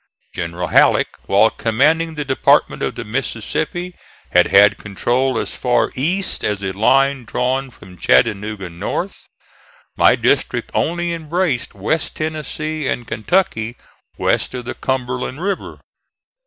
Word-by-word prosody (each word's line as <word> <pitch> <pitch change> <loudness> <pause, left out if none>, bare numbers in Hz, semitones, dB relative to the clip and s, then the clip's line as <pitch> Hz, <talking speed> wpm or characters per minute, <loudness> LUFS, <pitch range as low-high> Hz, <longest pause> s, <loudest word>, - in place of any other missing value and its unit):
General 85 +1 -4
Halleck - - +4 0.2
while - - +4
commanding 155 +8 +1
the 150 -1 -3
Department 130 -1 +2
of - - -2
the 120 - -5
Mississippi 135 +9 -3 0.4
had 90 0 +5
had 100 +1 +5
control 120 +5 0
as - - -3
far 125 -1 +1
east 175 +9 -1
as 105 -1 -1
a 95 - -1
line 135 +6 +2
drawn 130 +4 -1
from 95 -7 -15
Chattanooga 105 -3 +1
north. 100 - -5 0.7
My - - +5
district - - 0
only 170 0 0
embraced 160 - -2
West 125 +11 -2
Tennessee 155 -1 -3
and 120 - -2
Kentucky 115 - 0 0.4
west - - 0
of 125 -1 -6
the - - -4
Cumberland 130 +1 -3
River. 195 +1 -3
130 Hz, 130 wpm, -19 LUFS, 110-155 Hz, 0.7 s, had